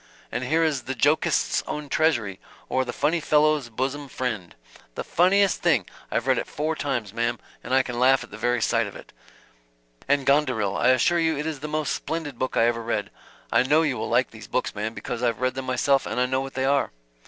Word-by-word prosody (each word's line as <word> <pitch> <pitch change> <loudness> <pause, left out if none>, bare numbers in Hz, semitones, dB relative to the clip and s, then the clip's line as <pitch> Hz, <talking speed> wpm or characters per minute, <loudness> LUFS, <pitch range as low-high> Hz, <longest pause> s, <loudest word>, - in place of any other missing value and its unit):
And 120 +3 -2
here 160 +5 +2
is 150 -5 0
'The 130 - -3
Jokist's 145 +6 +2
Own 150 -1 -4
Treasury, 120 -12 +1 0.3
or, 130 - +1
The 125 - -4
Phunny 155 +7 +1
Phellow's 150 -3 +2
Bosom 135 +5 -3
Phriend.' 110 -10 -4 0.4
The - - -3
funniest 195 +3 +3
thing! - - +3 0.2
I've - - -1
read - - +3
it - - -4
four 155 +2 -2
times, 120 -9 -3
ma'm, 120 +1 0 0.3
and - - -7
I 130 0 +4
can 120 -2 -5
laugh 130 +1 +4
at - - -14
the 105 - -8
very 120 0 +1
sight 115 -2 +1
of 100 - -10
it - - -12
yet. - - -29
And 140 -1 +2
'Gonderil,' 130 -9 +2
I - - +2
assure 130 +7 +4
you 160 -2 +1
it 150 - -3
is 160 -3 -3
the 150 - -5
most 155 0 -1
splendid 155 -6 -4
book 130 - -2
I 115 - +5
ever 115 0 +1
read. 115 +1 -2 0.4
I - - +5
know 150 +5 +3
you 140 -5 0
will 110 - -4
like 120 +2 +2
these 110 -1 -11
books, 125 - -1
ma'm, 110 +2 -4
because 125 -3 -5
I've 120 -2 0
read 130 0 0
them 135 0 -5
myself 135 +2 +2
and - - -2
I 125 - +3
know 130 +1 0
what 135 0 -7
they 130 0 0
are." 140 +1 +2
130 Hz, 230 wpm, -25 LUFS, 120-150 Hz, 0.4 s, I